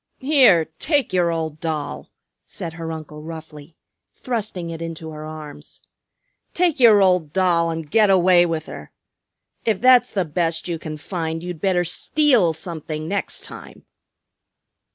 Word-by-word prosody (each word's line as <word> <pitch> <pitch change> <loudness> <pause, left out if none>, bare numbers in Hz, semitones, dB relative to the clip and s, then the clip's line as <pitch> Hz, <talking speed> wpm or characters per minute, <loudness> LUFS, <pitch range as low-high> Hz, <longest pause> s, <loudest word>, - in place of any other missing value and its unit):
"Here, 260 - +4
take 290 - 0
your 175 -2 +2
old 160 -2 -3
doll," 155 -3 -4 0.3
said 165 - -7
her 165 0 -6
uncle 155 -1 -8
roughly, 155 -1 -10 0.4
thrusting 210 -8 -4
it 165 0 -7
into 165 -1 -6
her 155 0 -8
arms. 155 -2 -10 0.8
"Take 340 -5 +2
your 220 -5 +7
old 180 -5 +2
doll 175 -3 +2
and 165 -1 -4
get 210 +6 +3
away 180 -2 +5
with 160 -2 -3
her. - - -10 0.7
If 215 -4 0
that's 255 +1 +5
the 190 -3 -1
best 165 +2 -2
you 170 -2 -3
can 155 -1 -6
find 165 0 -4
you'd 175 -3 -6
better 185 -2 +2
steal 240 - +2
something 155 -1 -6
next 200 +3 -3
time." - - -11
170 Hz, 145 wpm, -21 LUFS, 160-195 Hz, 0.8 s, your